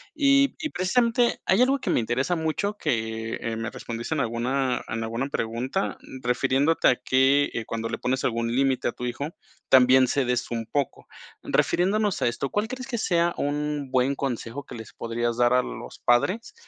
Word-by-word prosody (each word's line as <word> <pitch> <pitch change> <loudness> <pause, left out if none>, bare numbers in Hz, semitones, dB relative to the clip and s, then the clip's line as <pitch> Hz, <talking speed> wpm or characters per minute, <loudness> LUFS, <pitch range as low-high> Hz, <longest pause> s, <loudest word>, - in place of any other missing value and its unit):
Y 275 -1 +4
y 310 -3 -3
precisamente 235 +5 +2
hay 190 +5 +3
algo 270 +2 +3
que - - -2
me - - +3
interesa 130 +9 0
mucho, 170 +6 -2
que 115 -3 -2
me 115 +1 -3
respondiste 120 +5 -5
en 145 - 0
alguna 125 +2 -1
en 115 0 -3
alguna 115 +4 -2
pregunta, 125 +9 -2
mm, 130 -1 -11
refiriéndote 135 +3 +2
que, 135 +2 +4
eh, 115 - -3
cuando 115 0 -4
le - - -4
pones 130 +1 -1
algún 115 -1 0
límite 135 0 +1
a - - 0
tu 125 - -7
hijo, 125 +5 -3 0.4
también 130 0 +6
cedes 125 -2 0
un 115 -1 -3
poco. 140 +4 -3 0.4
Refiriéndonos 200 +2 +1
a - - +3
esto, 120 +3 -2
¿cuál 205 +1 -1
crees 255 +2 -6
que 250 -3 -3
sea 170 -5 +1
un 145 +1 -1 0.2
buen 130 +2 +2
consejo 135 0 -4
que - - -9
les 110 -2 -10
podrías 120 0 -2
dar 120 0 +4
a 125 - +5
los - - -8
padres, 185 - +1
130 Hz, 180 wpm, -25 LUFS, 120-170 Hz, 0.4 s, también